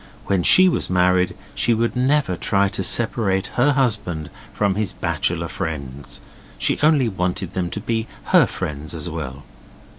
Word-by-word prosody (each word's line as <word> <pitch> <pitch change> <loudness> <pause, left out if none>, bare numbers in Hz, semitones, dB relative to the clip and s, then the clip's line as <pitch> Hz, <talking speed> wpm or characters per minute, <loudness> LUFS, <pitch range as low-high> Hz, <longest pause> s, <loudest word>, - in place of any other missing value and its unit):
When 95 -2 +1
she 185 - +6
was 180 - 0
married 90 0 +2 0.2
she 115 - +2
would 115 +2 -1
never 130 -5 +1
try 100 +3 +1
to 95 - -4
separate 100 -2 +2
her 140 +4 +3
husband 105 - -1 0.2
from 100 -2 0
his 105 -1 -2
bachelor - - -1
friends, 70 -3 -6 0.4
she - - +1
only 150 -4 +4
wanted 90 -2 -3
them 90 -2 -2
to 105 - -4
be 115 +1 -2 0.3
her - - +6
friends 75 +2 -5
as 80 +2 -5
well. 70 -3 -6
95 Hz, 155 wpm, -21 LUFS, 85-115 Hz, 0.4 s, she